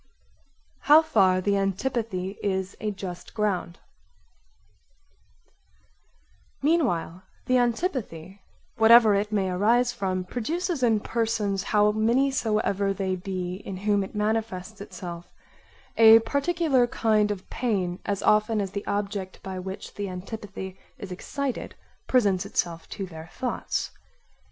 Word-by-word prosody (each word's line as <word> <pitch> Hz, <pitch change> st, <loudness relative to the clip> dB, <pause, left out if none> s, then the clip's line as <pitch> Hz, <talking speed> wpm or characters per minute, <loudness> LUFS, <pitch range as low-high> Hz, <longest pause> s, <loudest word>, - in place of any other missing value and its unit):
How 305 Hz, +2 st, +6 dB
far 190 Hz, -10 st, +3 dB
the 200 Hz, +1 st, +1 dB
antipathy 195 Hz, -1 st, -2 dB
is 190 Hz, -1 st, -2 dB
a 215 Hz, -, -2 dB
just 185 Hz, -3 st, -7 dB
ground 200 Hz, -5 st, -1 dB, 2.9 s
Meanwhile 235 Hz, -, +1 dB, 0.2 s
the 255 Hz, 0 st, +3 dB
antipathy, 230 Hz, -, -2 dB, 0.4 s
whatever 225 Hz, -1 st, +7 dB
it 205 Hz, +1 st, 0 dB
may 195 Hz, -3 st, 0 dB
arise 235 Hz, +6 st, +2 dB
from, 185 Hz, -5 st, -2 dB
produces 315 Hz, -, -2 dB
in 225 Hz, -4 st, +3 dB
persons 220 Hz, -4 st, -1 dB
how 210 Hz, +1 st, +3 dB
many 235 Hz, +6 st, +2 dB
soever 210 Hz, -5 st, 0 dB
they 190 Hz, -1 st, -1 dB
be 185 Hz, -1 st, -4 dB
in 195 Hz, -1 st, -7 dB
whom 205 Hz, +1 st, +1 dB
it 195 Hz, -, -9 dB
manifests 210 Hz, -2 st, -2 dB
itself, 175 Hz, -3 st, -8 dB, 0.7 s
a 225 Hz, 0 st, +9 dB
particular 280 Hz, +1 st, +1 dB
kind 215 Hz, -3 st, +2 dB
of 205 Hz, -3 st, -5 dB
pain 190 Hz, -7 st, -1 dB
as 200 Hz, -1 st, -2 dB
often 215 Hz, +1 st, +3 dB
as 195 Hz, -2 st, -2 dB
the 200 Hz, +1 st, -5 dB
object 200 Hz, -2 st, -3 dB
by 190 Hz, -1 st, -5 dB
which 190 Hz, +1 st, -7 dB
the 200 Hz, -1 st, -4 dB
antipathy 190 Hz, 0 st, -7 dB, 0.2 s
is 195 Hz, -, -8 dB
excited 265 Hz, +8 st, -4 dB, 0.3 s
presents 200 Hz, -8 st, +3 dB
itself 170 Hz, -1 st, -3 dB
to 195 Hz, -, -5 dB
their 160 Hz, -2 st, -10 dB
thoughts. 250 Hz, -2 st, -3 dB
205 Hz, 120 wpm, -26 LUFS, 190-230 Hz, 2.9 s, a